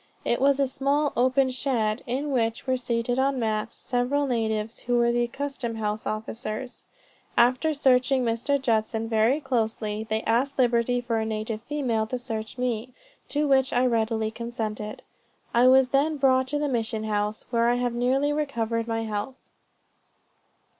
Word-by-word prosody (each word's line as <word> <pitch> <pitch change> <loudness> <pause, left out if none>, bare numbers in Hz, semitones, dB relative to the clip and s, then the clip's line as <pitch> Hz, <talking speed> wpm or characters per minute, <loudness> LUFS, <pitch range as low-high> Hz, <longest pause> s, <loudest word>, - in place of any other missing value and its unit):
It 240 - 0
was 280 0 +4
a 275 - +4
small 280 +3 0
open 260 +2 +3
shed, 240 -4 -1
in 275 +4 -2
which 230 -3 0
were 260 -1 +1
seated 245 0 -1
on 270 0 +2
mats, 220 -1 -2
several 255 +4 0
natives, 225 -3 -1
who 245 0 0
were 235 0 +3
the 240 0 +1
custom 265 -2 -4
house 215 -1 -3
officers. 215 +2 -5 0.5
After 255 +6 +4
searching 260 -1 +3
Mr. 235 +5 0
Judson 225 -3 0
very 225 +5 +2
closely, 220 -5 -1
they 220 0 -2
asked 255 +5 +1
liberty 245 -1 +2
for 235 -2 -1
a - - 0
native 215 0 -3
female 240 -5 -1
to 255 - -3
search 225 -2 -5
me, 245 -1 -2 0.4
to 295 +1 0
which 265 -1 +3
I 245 +1 +2
readily 225 -2 0
consented. 220 -2 -5 0.5
I 240 +2 +5
was 260 0 +6
then 295 +3 +2
brought 260 -1 +3
to 295 +3 -1
the 295 0 0
mission 225 -4 -1
house, 210 0 -2
where 235 -1 +3
I 240 - +3
have 245 -1 -1
nearly 265 +4 +1
recovered 235 -6 -1
my 225 -1 -1
health." 215 +4 -4
240 Hz, 160 wpm, -26 LUFS, 225-265 Hz, 0.5 s, was